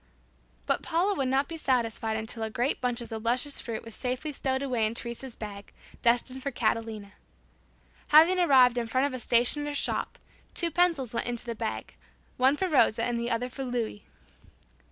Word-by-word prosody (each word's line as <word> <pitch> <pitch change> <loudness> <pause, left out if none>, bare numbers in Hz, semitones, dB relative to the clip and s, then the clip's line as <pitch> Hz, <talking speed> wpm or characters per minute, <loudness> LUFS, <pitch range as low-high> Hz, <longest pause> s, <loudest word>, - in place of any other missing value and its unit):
But - - 0
Paula 350 +5 +1
would 275 -8 -1
not 270 +2 +1
be 330 - -6
satisfied 230 -4 0
until 220 +1 -5
a 220 - -2
great 245 +5 -1
bunch 245 -1 0
of 235 - -8
the 225 - -4
luscious 245 +6 0
fruit 230 -2 -5
was 230 - -9
safely 255 +6 -3
stowed 265 -1 -1
away 245 -5 +1
in 220 - -5
Teresa's 235 +1 -5
bag, 200 -2 -8 0.3
destined 245 +2 +2
for 280 - -2
Catalina. 220 -4 -2 0.9
Having 330 +5 +6
arrived 255 -7 +5
in 235 - -3
front 255 +4 +1
of 285 - -2
a 255 - -4
stationer's 285 +5 +1
shop, - - -1 0.4
two 340 -2 0
pencils 320 -8 +1
went 235 - -2
into 240 -1 -1
the 235 - -3
bag, 220 -1 -5 0.4
one 265 +3 +4
for 380 - 0
Rosa 245 -8 +3
and 240 0 0
the 235 +1 -2
other 235 +1 -1
for 270 +2 -6
Louis. 240 -4 -3
245 Hz, 185 wpm, -28 LUFS, 230-275 Hz, 0.9 s, Having